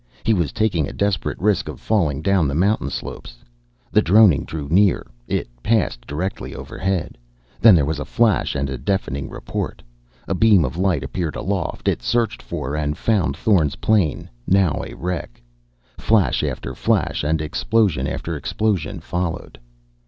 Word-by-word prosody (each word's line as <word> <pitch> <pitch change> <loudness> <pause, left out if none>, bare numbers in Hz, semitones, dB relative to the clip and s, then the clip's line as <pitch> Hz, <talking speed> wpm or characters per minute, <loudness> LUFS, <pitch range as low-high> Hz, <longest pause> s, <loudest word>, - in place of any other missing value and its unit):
He 115 - +3
was 85 -7 0
taking 100 -10 0
a - - -8
desperate 100 -1 -1
risk 105 0 +1
of - - -8
falling 80 -10 0
down 95 -5 +3
the 70 - -2
mountain 95 -2 +1
slopes. - - -7 0.5
The - - +4
droning 100 -6 +5
drew 75 -3 -5
near. 95 +4 +3 0.2
It - - -1
passed 105 - 0
directly 90 +7 -4
overhead. 95 -9 -3 0.4
Then 110 -4 +8
there 75 -4 +3
was 75 0 -2
a - - -2
flash 110 -11 +1
and 70 -1 -1
a 65 -2 -5
deafening 70 -9 -2
report. - - -5 0.4
A - - 0
beam 100 -4 +5
of 65 - -4
light 90 -6 +1
appeared 80 +4 -3
aloft. 95 -1 -3
It - - +1
searched 120 -3 0
for 70 +4 -4
and 75 0 -2
found 90 -11 +1
Thorn's 85 -8 +2
plane, 100 -9 +1 0.2
now 95 -5 +3
a - - -8
wreck. 90 -7 -4 0.6
Flash 110 -6 +2
after - - -3
flash - - 0
and 80 +2 +1
explosion 95 +4 +1
after 85 - -4
explosion 100 +2 -1
followed.... 85 -6 -4
90 Hz, 160 wpm, -21 LUFS, 75-100 Hz, 0.6 s, Then